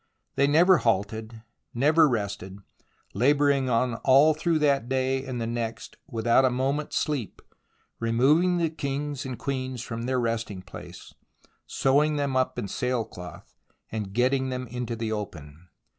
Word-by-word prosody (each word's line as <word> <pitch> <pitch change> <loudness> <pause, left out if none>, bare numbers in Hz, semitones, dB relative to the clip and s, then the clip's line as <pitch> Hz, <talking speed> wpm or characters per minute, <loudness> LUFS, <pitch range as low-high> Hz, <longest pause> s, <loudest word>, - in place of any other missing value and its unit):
They 140 - +2
never 170 +5 +5
halted, 110 +1 -2 0.3
never 150 +5 +4
rested, 100 -4 -3 0.6
labouring 140 +3 +2
on 120 +1 +1
all 140 +4 +6
through 160 +2 0
that 140 -5 +1
day 130 0 0
and 130 -3 -5
the 115 - -2
next 115 -1 -4
without 120 -1 +2
a 130 - +4
moment's 135 +4 -1
sleep, 140 - -2 0.6
removing 145 +11 +3
the 165 -2 0
kings 145 -2 -4
and 130 -2 -5
queens 130 -3 -4
from 115 0 -5
their 130 0 +1
resting 115 -5 -2
place, - - -11 0.5
sewing 150 +3 +2
them 140 -2 -1
up 130 0 0
in 100 - -3
sailcloth, 110 -7 -4 0.4
and 105 -3 -4
getting 130 +4 +1
them 130 0 -4
into 125 -1 -4
the 115 -1 -3
open. 85 -6 -7
130 Hz, 145 wpm, -26 LUFS, 115-140 Hz, 0.6 s, all